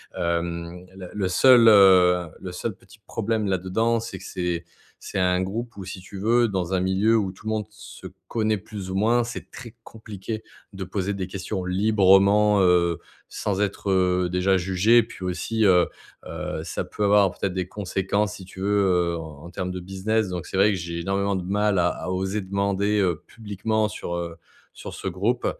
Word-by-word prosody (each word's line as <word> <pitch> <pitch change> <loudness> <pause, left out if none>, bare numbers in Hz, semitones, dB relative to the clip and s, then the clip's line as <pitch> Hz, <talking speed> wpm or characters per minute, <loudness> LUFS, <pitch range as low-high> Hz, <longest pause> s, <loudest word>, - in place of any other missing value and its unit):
hem, 85 +1 -3
le 95 -2 -9
le 100 -3 -1
seul, 120 +5 +6
heu, 90 -4 +6
le 95 - -7
seul 105 +3 -4
petit 110 +2 -20
problème 110 0 -2
là-dedans, 95 +5 0
c'est 115 -4 -6
que - - -13
c'est 90 -1 -3 0.3
c'est - - -5
un 90 0 +2
groupe 110 +5 -4
où 100 - -6
si 95 0 -7
tu 95 +2 -11
veux, 115 +4 +3
dans 95 -3 -2
un 95 - +2
milieu 95 +5 +2
où 95 -4 -1
tout 95 - -18
le 110 - -2
monde 110 -1 -1
se 105 0 -11 0.2
connaît 110 -2 0
plus 100 -1 -8
ou 95 - -4
moins, 115 +5 +3
c'est 120 +1 -7
très 120 -2 -10
compliqué 110 -1 -7 0.3
de 95 0 -5
poser 95 +2 -2
des 95 -2 -4
questions 95 0 -4
librement, 100 +1 +4
heu, 90 -2 +3 0.3
sans 100 -1 -2
être, 100 -1 -1
heu, 90 -1 +2
déjà 90 +2 +2
jugé 95 +5 +3
et - - +3
puis - - -11
aussi, 110 +5 -1
heu 90 -3 +5 0.4
heu, - - -5
ça - - -4
peut 105 - -4
avoir 100 -1 +5
peut-être 95 - -2
des 90 -1 -2
conséquences, 100 +1 -1
si 95 - -11
tu 95 0 -11
veux, 100 +1 +2 0.3
heu, - - -3
en 80 -2 -9
en 85 - -9
termes 90 -1 -4
de 90 0 -5
business 95 +3 -1
donc 90 -2 -5
c'est - - -4
vrai 100 +2 +5
que 95 - -1
j'ai 85 -1 -5
énormément 100 +2 0
de 90 - -3
mal 105 +2 +1
à 90 0 +3
à - - -6
oser 95 +3 -1
demander, 100 +2 0
heu, 90 -5 0
publiquement 110 0 -2
sur, 85 -4 -5
heu, 85 -1 -5 0.4
sur - - -9
ce - - -6
groupe, 105 +8 -1
95 Hz, 200 wpm, -24 LUFS, 90-105 Hz, 0.4 s, seul